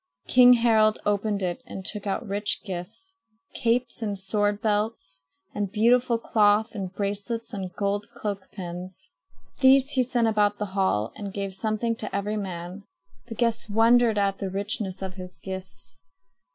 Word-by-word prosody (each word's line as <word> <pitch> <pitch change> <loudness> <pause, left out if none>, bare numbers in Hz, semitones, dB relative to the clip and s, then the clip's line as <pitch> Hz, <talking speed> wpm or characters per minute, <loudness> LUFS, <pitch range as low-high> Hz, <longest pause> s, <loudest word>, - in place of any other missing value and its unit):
King 250 0 +8
Harald 220 -3 +4
opened 205 -1 0
it 180 +7 -2
and 190 -6 -7
took 210 0 -3
out 200 +3 -2
rich 205 +1 -1
gifts 210 - -7 0.4
capes 240 +1 0
and 205 -3 -2
sword 205 +2 0
belts 210 -6 -1 0.3
and 205 -2 -2
beautiful 235 +2 +3
cloth 215 0 +2
and 195 -4 -4
bracelets 205 +4 -4
and 190 -3 -4
gold 205 0 -1
cloak 200 -3 -4
pins. 180 -1 -8 0.5
These 270 +1 +5
he 260 - +2
sent 245 -2 +1
about 210 -1 +2
the 205 -2 -5
hall 120 - +1
and 200 -2 -6
gave 195 -1 -4
something 220 +3 -1
to 215 - -4
every 205 +2 -1
man. 185 -1 -5 0.5
The 225 - -7
guests 230 -1 0
wondered 225 +1 +4
at 195 -1 +1
the 195 - -3
richness 195 -1 -3
of 190 -1 -4
his 180 -1 -9
gifts. 190 -8 -5
205 Hz, 155 wpm, -26 LUFS, 195-225 Hz, 0.5 s, King